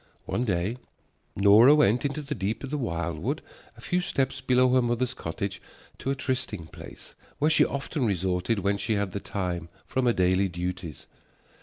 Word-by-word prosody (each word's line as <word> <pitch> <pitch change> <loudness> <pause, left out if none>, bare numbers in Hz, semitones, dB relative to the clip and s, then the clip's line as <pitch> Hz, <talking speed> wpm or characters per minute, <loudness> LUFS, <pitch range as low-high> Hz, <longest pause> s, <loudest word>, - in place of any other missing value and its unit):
One 120 - -1
day 100 +3 -1 0.6
Nora 105 +8 +7
went 125 -4 +3
into 145 +2 -2
the 145 +1 -3
deep 105 +1 -3
of 135 - -6
the 150 - -1
wildwood 85 - -2 0.3
a - - -13
few 180 0 0
steps 135 -5 -1
below 130 0 +3
her 130 - +5
mother's 120 +1 0
cottage 95 -2 -5 0.4
to - - -3
a 135 - +1
trysting 130 - -2
place - - -12 0.2
where 150 +2 +2
she - - +5
often 140 -1 -2
resorted 95 +2 0
when 100 +1 0
she 110 - 0
had 100 -2 -1
the 100 - -3
time 90 -4 -3 0.2
from 130 -1 0
her 120 - +4
daily 95 +1 +2
duties. 90 -2 -5
110 Hz, 175 wpm, -27 LUFS, 95-130 Hz, 0.6 s, Nora